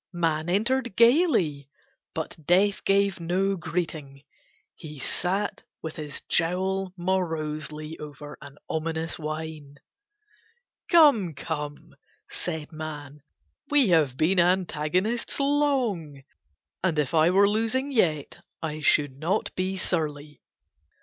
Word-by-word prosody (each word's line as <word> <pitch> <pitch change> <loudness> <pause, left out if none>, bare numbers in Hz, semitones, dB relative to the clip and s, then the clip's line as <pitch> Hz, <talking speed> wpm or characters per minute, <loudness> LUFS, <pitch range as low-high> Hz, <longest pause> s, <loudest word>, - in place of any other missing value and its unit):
Man 165 -1 0
entered 235 +4 0
gaily 230 - +3 0.5
but - - -4
Death 190 +5 +3
gave 200 -1 +2
no 185 +4 0
greeting, 155 -6 -4 0.5
he 150 -2 -10
sat 190 +9 -1 0.2
with 160 -1 -5
his 150 -2 -6
jowl 190 +3 0
morosely 155 -4 -2
over 150 0 -9
an 140 -1 -12
ominous 160 +1 -2
wine. 155 -2 -6 1.1
"Come, 280 - +5
come," 145 0 -5 0.4
said 160 -2 -4
Man, 150 -2 -7 0.5
"we 285 -7 +4
have 150 -7 +3
been 175 +5 +3
antagonists 180 - +1
long, 255 - 0 0.6
and 175 -4 +1
if 150 0 0
I 160 +1 +5
were 195 +2 +5
losing 230 +6 0
yet 160 - 0 0.2
I 155 -1 -4
should 145 -1 +3
not 165 +10 -1
be 185 +1 -2
surly." 150 -5 -2
165 Hz, 110 wpm, -26 LUFS, 150-195 Hz, 1.1 s, Come